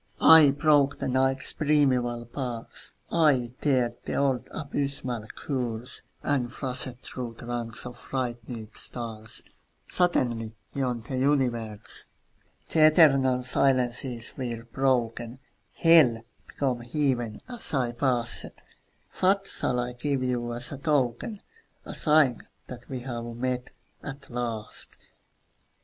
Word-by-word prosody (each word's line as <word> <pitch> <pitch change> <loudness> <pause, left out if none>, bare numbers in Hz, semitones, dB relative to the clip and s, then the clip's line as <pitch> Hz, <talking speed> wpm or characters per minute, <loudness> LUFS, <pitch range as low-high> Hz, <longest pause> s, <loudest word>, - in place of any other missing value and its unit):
I 160 -3 +9
broke 145 0 +3
the - - -3
Night's 130 +1 +1
primeval 130 -6 +2
bars, 120 -1 -5 0.2
I 140 -8 +3
dared 125 -5 +2
the - - -3
old 135 -3 +1
abysmal 140 -6 -3
curse, 125 -3 -3 0.2
And 130 -4 0
flashed 130 -1 -2
through 120 -3 -6
ranks 120 -1 -4
of 125 -1 -8
frightened 120 -3 -4
stars 115 -2 -6 0.4
Suddenly 120 -11 +1 0.2
on 125 -4 -1
the 130 +3 -4
universe! 120 -6 0 0.6
The 155 -1 +6
eternal 135 -5 +5
silences 125 -2 0
were 120 -3 -4
broken; 120 -2 0 0.4
Hell 150 -9 +5 0.2
became 130 -4 -1
Heaven 120 -3 -1
as 245 -2 -3
I 125 -5 +1
passed. 120 -1 -1 0.6
What 195 +1 +3
shall 125 -9 -1
I 125 0 -2
give 135 +1 -1
you 120 -2 -1
as 120 +1 -3
a 140 - -6
token, 145 - 0 0.4
A - - -6
sign 150 -6 +4 0.2
that 120 -1 -10
we 130 -2 -4
have 120 -2 -5
met, 125 +1 -3 0.3
at 140 -1 -8
last? 115 -3 -4
125 Hz, 115 wpm, -27 LUFS, 120-140 Hz, 0.6 s, I